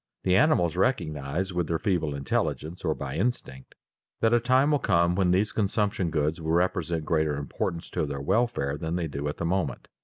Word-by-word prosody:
The 90 - +3
animals 95 - +3
recognize 90 - -1
with 85 -2 -1
their 85 - 0
feeble 80 -6 0
intelligence 75 +4 -2
or 80 -3 0
by - - -5
instinct, 90 - -3 0.4
that 115 +1 +3
a 120 - +5
time 130 +5 +3
will 145 - +3
come 85 -6 +2
when 95 0 +2
these 100 +4 +2
consumption 100 -3 0
goods 80 +1 -1
will 80 0 -1
represent 85 -2 0
greater 80 -2 +1
importance 80 +3 -3
to 75 - -1
their 70 -1 -4
welfare 95 - 0
than 80 +3 -3
they 90 -2 -1
do 70 -1 -4
at 75 - -4
the 85 - -3
moment. 85 -6 -1
85 Hz, 190 wpm, -27 LUFS, 75-100 Hz, 0.4 s, a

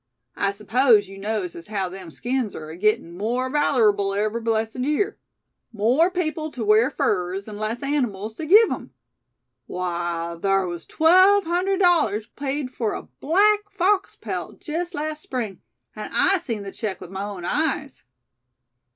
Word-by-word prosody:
I 200 - +1
s'pose 215 +1 +3
yew 195 0 -11
knows 205 -3 -3
as 170 - -10
haow 200 -3 -2
them 185 -1 -9
skins 240 +4 -2
air 155 0 -7
agittin' 175 -1 0
more 245 +7 -1
valerable 215 -9 +2
every 215 +3 -1
blessed 225 0 -1
year. 300 +11 0 0.5
More 245 - +3
people 320 -4 -2
tew 245 -7 -5
wear 215 +4 +5
furs, 190 -6 -1
an' 210 -1 -7
less 220 +4 -3
animals 225 -7 -1
tew 315 - -5
give 425 +6 +7
'em. - - -5 0.7
Why, 170 -2 -3
thar 195 -1 +2
was 175 -2 -6
twelve 370 +5 +5
hundred 365 +3 0
dollars 300 - +3
paid 275 +2 -4
fur 225 -4 -2
a - - -5
black 410 +6 +2
fox 395 0 +1
pelt - - -6
jest 340 +3 -4
last 305 +1 -3
Spring; 230 -10 -4 0.3
an' - - -6
I 390 -1 +4
seen 230 -10 -4
the 195 - -7
check 210 -4 -4
with 175 - -10
my 195 0 -4
own 200 -4 -6
eyes." 295 - -1
230 Hz, 160 wpm, -23 LUFS, 200-310 Hz, 0.7 s, give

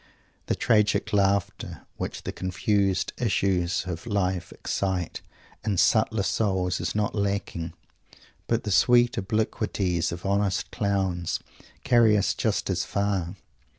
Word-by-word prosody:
The - - +1
tragic 105 -2 +2
laughter 100 -1 0
which - - -5
the - - -3
confused 95 +1 0
issues 95 -5 +1
of 85 +2 -5
life 95 -4 -1
excite 95 -3 -2 0.4
in 105 -3 0
subtler 110 +1 +3
souls 95 -2 0
is - - -2
not 105 -1 0
lacking, 100 -5 -2 0.7
but 115 0 +1
the 105 - -3
sweet 120 +3 +5
obliquities 100 -4 -1
of 85 +2 -7
honest 100 -2 0
clowns 95 -4 -1 0.4
carry 115 -3 +5
us 100 - +1
just 110 -4 -1
as 90 -1 0
far. 100 -3 -1
100 Hz, 120 wpm, -26 LUFS, 90-105 Hz, 0.7 s, sweet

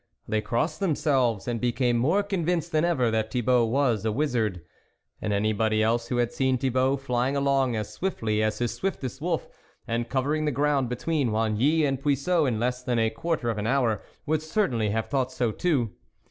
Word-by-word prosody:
They 110 0 0
crossed 120 - -1
themselves, 135 - +1
and 120 -2 -2
became 120 0 +1
more 160 +13 +2
convinced 175 -4 -1
than 155 -1 +2
ever 130 -10 +2
that 110 0 0
Thibault 125 0 +2
was 120 -4 +1
a 110 - 0
wizard. 115 - 0 0.6
And 105 - -2
anybody 110 +1 +1
else 115 +1 +1
who 120 - -1
had 120 -1 0
seen 130 -1 +1
Thibault, 130 +1 +1
flying 130 0 -1
along 135 -3 +2
as 105 -1 -4
swiftly 110 - -1
as 110 0 0
his 120 -1 -1
swiftest 140 -8 -4
wolf, 165 0 -1 0.4
and 115 0 -2
cover 135 +2 0
ing 155 0 0
the 150 - +1
ground 140 -2 +1
between 140 +1 -1
Oigny 115 +9 +2
and 135 -1 -2
Puiseux 145 +3 +2
in 115 -4 0
less 125 +2 -1
than 125 -1 -1
a 115 -1 +2
quarter 120 0 -1
of 110 - -4
an 105 - -2
hour, 120 -5 +1 0.2
would 155 0 0
certainly 155 - 0
have 110 +1 -1
thought 130 -2 0
so 120 -3 0
too. 130 - 0
125 Hz, 190 wpm, -26 LUFS, 115-145 Hz, 0.6 s, more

